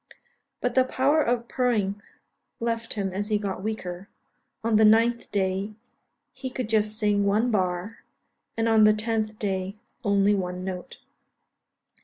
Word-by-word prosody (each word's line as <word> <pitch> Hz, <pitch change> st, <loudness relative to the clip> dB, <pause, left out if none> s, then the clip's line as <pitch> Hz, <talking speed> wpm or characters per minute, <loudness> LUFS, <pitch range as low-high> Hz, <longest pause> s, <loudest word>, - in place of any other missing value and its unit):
But 245 Hz, -1 st, 0 dB
the 260 Hz, -, +5 dB
power 270 Hz, +4 st, +2 dB
of 235 Hz, -3 st, 0 dB
purring 210 Hz, -6 st, 0 dB, 0.6 s
left 230 Hz, 0 st, -2 dB
him 195 Hz, -3 st, -2 dB
as 205 Hz, +2 st, -2 dB
he 210 Hz, -1 st, +2 dB
got 200 Hz, -3 st, -4 dB
weaker; 190 Hz, -3 st, -5 dB, 0.5 s
on 225 Hz, -1 st, +3 dB
the 220 Hz, -, +5 dB
9th 230 Hz, +2 st, +4 dB
day 195 Hz, +1 st, -1 dB, 0.6 s
he 260 Hz, -, -5 dB
could 255 Hz, -3 st, -4 dB
just 215 Hz, -1 st, +1 dB
sing 205 Hz, -2 st, +2 dB
one 215 Hz, +5 st, +2 dB
bar, 185 Hz, +1 st, -1 dB, 0.6 s
and 225 Hz, 0 st, +1 dB
on 220 Hz, -1 st, +5 dB
the 215 Hz, 0 st, +5 dB
10th 215 Hz, 0 st, -2 dB
day 190 Hz, -1 st, -2 dB, 0.3 s
only 200 Hz, -1 st, +3 dB
one 180 Hz, -2 st, -2 dB
note. 185 Hz, -1 st, -6 dB
215 Hz, 145 wpm, -26 LUFS, 195-230 Hz, 0.6 s, the